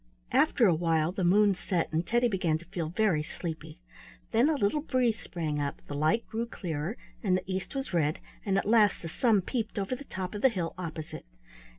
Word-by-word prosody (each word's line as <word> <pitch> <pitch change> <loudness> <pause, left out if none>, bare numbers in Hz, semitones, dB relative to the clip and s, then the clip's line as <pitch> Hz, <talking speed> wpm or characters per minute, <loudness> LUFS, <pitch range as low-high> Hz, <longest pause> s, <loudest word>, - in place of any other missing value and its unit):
After 235 - +4
a 185 - +5
while 165 0 +1
the 185 0 -3
moon 200 +3 +5
set 180 -2 -1
and 160 +2 +1
Teddy 240 +6 +2
began 180 -7 +1
to 170 - -14
feel 170 -2 -4
very 180 -3 +2
sleepy. 160 0 -6 0.5
Then 235 +7 +4
a 315 - +2
little 265 +3 +1
breeze 250 -6 +1
sprang 155 -4 -3
up; 140 -1 -3
the - - -7
light 155 +11 +1
grew 230 +1 -3
clearer 170 0 -4 0.2
and 185 -5 +2
the - - -5
east 190 +7 -4
was 270 -6 -3
red, 155 -3 +2 0.3
and 195 -2 +1
at - - 0
last 210 -3 +4
the 165 - -4
sun 215 +1 +2
peeped 225 0 -3
over 200 +5 -1
the 280 +3 -10
top 185 -4 -5
of 205 - -5
the 265 - +6
hill 180 -7 -3
opposite. 160 - -6
185 Hz, 210 wpm, -29 LUFS, 165-220 Hz, 0.5 s, the